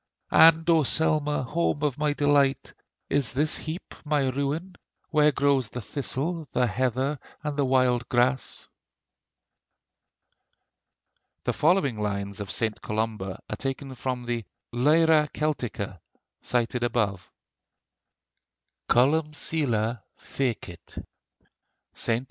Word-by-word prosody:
And 165 0 +7
O 165 -2 +5
Selma! 150 0 +1
home 150 +1 -1
of 145 -2 0
my 150 -1 +1
delight, 145 -2 +2 0.3
Is 140 -3 +1
this 150 +4 +2
heap 160 +3 -6
my 145 -3 +1
ruin, 140 +8 -3 0.4
Where 150 -1 +4
grows 140 -4 +1
the 125 - -6
thistle, 150 +6 -3
the 125 - +3
heather, 130 +5 -1 0.2
and 150 -1 -3
the 140 -1 +1
wild 130 -2 +2
grass? 125 +2 0 2.8
The - - 0
following 150 - +2
lines 100 0 -3
of 100 - -5
St. 110 -2 -2
Columba 105 -3 -3
are - - -4
taken 135 0 -4
from 125 0 -4
the 120 -1 -2 0.3
'Lyra 150 +4 +4
Celtica,' 120 - -3 0.4
cited 120 0 -1
above: 105 -6 -1 1.6
COLUMCILLE 140 -4 +2 0.2
FECIT 110 -10 -5 0.9
(ST. 115 0 0
135 Hz, 105 wpm, -26 LUFS, 120-150 Hz, 2.8 s, And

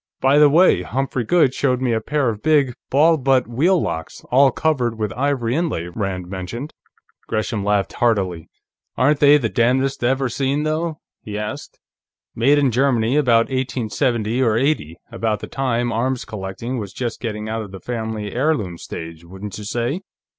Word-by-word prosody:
"By 135 +2 +4
the 150 -1 +7
way, 165 - +5
Humphrey 130 +6 -2
Goode 145 0 +3
showed 130 -3 +1
me 130 -2 0
a 110 - 0
pair 140 +1 0
of 105 -2 -5
big 145 -5 +3 0.2
ball 160 +4 +4
butt 130 -2 +2
wheel 165 +11 +2
locks, 80 - -4
all 135 +2 +6
covered 125 -5 0
with 105 -3 -2
ivory 130 -3 0
inlay," 145 - -1
Rand 95 -4 -3
mentioned. 100 - -6 0.5
Gresham 110 -1 -2
laughed 100 -1 0
heartily. 95 -8 0 0.5
"Aren't 145 +4 +3
they 145 0 +7
the 125 -6 -1
damnedest 130 +4 +1
ever 130 +2 +1
seen, 135 +4 -1
though?" 155 +1 -2 0.2
he 105 -1 -6
asked. 105 0 -6 0.5
"Made 135 +6 +3
in 140 -3 +3
Germany, 125 -1 +2
about 120 -6 +3
1870 120 -2 -1
or 115 -4 +2
'80, 120 - 0
about 115 -2 -1
the - - -6
time 120 -3 -1
arms 125 +3 -1
collecting 105 +4 -5
was 100 -3 -6
just 120 -3 -4
getting 105 -2 -4
out 110 +1 -2
of 105 - -7
the 95 - -8
family 110 -1 -4
heirloom 120 - 0
stage, 80 0 -8
wouldn't 95 +4 -8
you 105 - -7
say?" 120 - -2
120 Hz, 170 wpm, -20 LUFS, 105-135 Hz, 0.5 s, the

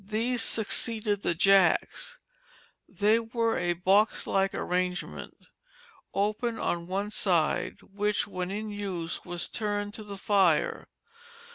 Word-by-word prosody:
These 230 +3 0
succeeded 220 -2 +2
the 170 - 0
jacks; 195 - +3 0.7
they 205 +4 +3
were 230 0 -1
a 175 0 0
box 195 +5 +2
like 195 0 +1
arrangement 180 - -3 0.8
open 215 +4 -1
on 170 0 -2
one 200 +3 -2
side 175 -7 0
which 210 +1 -1
when 185 -2 -4
in 210 +2 -4
use 185 -5 -4
was 175 -2 -3
turned 205 -2 -3
to 215 - -7
the 200 -1 -8
fire. 190 -5 +2
200 Hz, 120 wpm, -28 LUFS, 180-215 Hz, 0.8 s, jacks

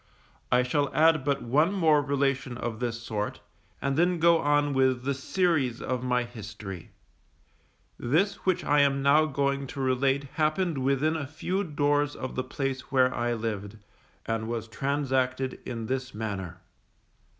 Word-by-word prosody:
I 125 +1 +4
shall 140 +3 0
add 160 -2 +4
but 140 0 0
one 150 +9 +3
more 160 -6 +4
relation 140 -3 -1
of 115 -2 -4
this 120 -2 -2
sort, 105 -2 -3 0.4
and 140 0 0
then 175 +1 +3
go 170 0 +5
on 145 -1 +2
with 130 -2 +2
the 140 +1 0
series 140 -3 0
of 125 -1 -3
my 125 -1 +1
history. 105 -6 -8 1.1
This 165 +12 +1
which 185 -2 +1
I 145 0 +3
am 140 -1 +2
now 150 +3 +5
going 140 -1 -1
to 135 - -8
relate 135 +1 +1 0.2
happened 155 0 +1
within 140 +4 +1
a 150 -4 -3
few 180 +6 -2
doors 145 -3 +1
of 130 - -5
the 130 - -2
place 135 0 -4
where 130 -1 +3
I 120 0 0
lived, 110 -2 -4 0.5
and 115 0 -2
was 115 -1 -3
transacted 130 0 -1
in 115 -3 -4
this 130 +1 -3
manner. 100 -5 -4
135 Hz, 155 wpm, -27 LUFS, 120-145 Hz, 1.1 s, go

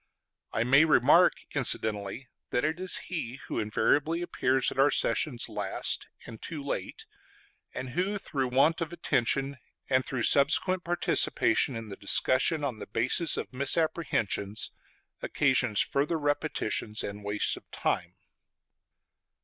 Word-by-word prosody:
I 110 - 0
may 135 +5 +5
remark 160 - +5 0.2
incidentally 105 +3 -2 0.2
that 125 - 0
it 160 +3 -1
is 185 0 +2
he 135 -8 -5
who - - -3
invariably 150 +10 +1
appears 130 -6 0
at - - -6
our 140 +2 +5
sessions 125 -1 0
last, 105 -3 -2 0.2
and 110 -2 -11
too 155 -4 -6
late; 140 - -5 0.7
and 130 -1 -5
who, 185 +7 -1
through 135 -9 -3
want 140 +7 +2
of 165 -1 -3
attention 140 -4 -1 0.3
and 130 0 +3
through 130 -3 -3
subsequent 180 - +3
participation 175 -6 +1
in 115 -1 -7
the 100 - -7
discussion 130 +9 +2
on 125 -6 -3
the - - -8
basis 130 - +2
of - - -5
misapprehensions, 130 - -1 0.5
occasions 125 -6 +1
further 150 +4 0
repetitions 145 -7 -1
and 100 0 -6
waste 105 0 0
of - - -15
time. - - -2
135 Hz, 135 wpm, -28 LUFS, 115-155 Hz, 0.7 s, may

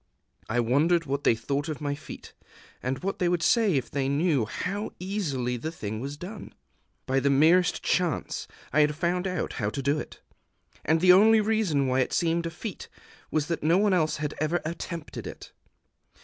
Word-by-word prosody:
I 115 +2 +1
wondered 155 +9 +2
what 140 0 -2
they - - +4
thought 140 +6 -2
of 155 - -4
my 145 -2 -2
feat, 145 - -10 0.5
and 130 +5 -3
what 195 +1 -2
they 180 - +2
would 175 -1 0
say 210 +1 +3
if 130 -3 -2
they 135 -1 -1
knew 145 -4 +2
how 200 - -4
easily 150 -11 -2
the 155 +7 -4
thing 110 -8 -5
was 140 +4 -5
done. 190 +7 -9 0.5
By 135 +1 +1
the 140 - +1
merest 160 +6 +4
chance 175 -6 -1 0.3
I 150 - +4
had 150 0 +2
found 180 +3 0
out 180 -3 -2
how 105 - +1
to 135 +5 -5
do 140 +3 +1
it; - - -8 0.6
and 160 +2 +2
the 180 0 +8
only 220 +4 +6
reason 210 -10 +1
why 130 0 +1
it 130 - 0
seemed 170 0 +1
a - - -3
feat 180 +4 -7 0.4
was 155 -2 0
that 170 +1 -3
no 165 +4 +3
one 205 0 +3
else 160 -4 +1
had 150 -1 -3
ever 160 +3 +1
attempted 165 0 -6
it. - - -10
155 Hz, 190 wpm, -27 LUFS, 140-180 Hz, 0.6 s, the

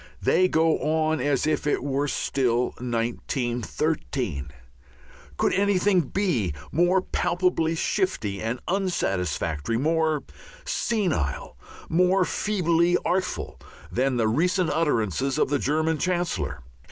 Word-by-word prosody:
They 185 - +3
go 160 -2 +2
on 155 0 +1
as 140 0 +1
if 155 -1 0
it 145 - +1
were 140 +1 0
still 125 -3 0
1913. 120 - -2 0.9
Could - - +2
anything 200 -1 +3
be 135 - -1 0.2
more 175 +4 +3
palpably 175 -3 0
shifty 160 - -1
and 115 +3 -2
unsatisfactory, 95 - -1
more 155 +2 +1 0.4
senile, 175 - -1 0.3
more 180 +3 +3
feebly 175 -4 +1
artful, 185 +2 -2 0.3
than 130 0 +1
the 115 -2 +2
recent 175 - +1
utterances 135 - 0
of - - +2
the 145 -1 +1
German 155 +3 0
Chancellor? 95 - -1
155 Hz, 105 wpm, -25 LUFS, 120-175 Hz, 0.9 s, They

